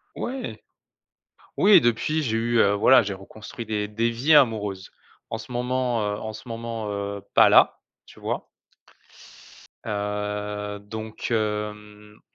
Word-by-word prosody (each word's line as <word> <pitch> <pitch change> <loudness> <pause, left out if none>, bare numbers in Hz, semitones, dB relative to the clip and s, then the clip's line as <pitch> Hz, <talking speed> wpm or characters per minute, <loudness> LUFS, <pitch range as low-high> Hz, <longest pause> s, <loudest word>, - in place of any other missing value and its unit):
Ouais. 255 0 -5 1.0
Oui 205 -6 +7
depuis 135 +7 +1
j'ai 115 -3 0
eu, 120 +1 0
heu, 100 -1 +4
voilà 120 +4 +6
j'ai 100 -1 -3
reconstruit 110 +4 -9
des 105 -1 -2
des 115 +3 0
vies 135 +7 +3
amoureuses. 105 -8 +2 0.4
En 115 - -3
ce 110 +2 -11
moment, 125 -1 -1
heu, 105 0 -2
en 110 0 -6
ce 110 +4 -11
moment, 115 -1 -5
heu, 100 0 -4
pas - - +7
là - - +5 0.2
tu - - -16
vois? - - -4 1.4
Heu 105 0 -3
donc, 110 +2 -7
hem 105 -1 -3
110 Hz, 135 wpm, -24 LUFS, 105-120 Hz, 1.4 s, Oui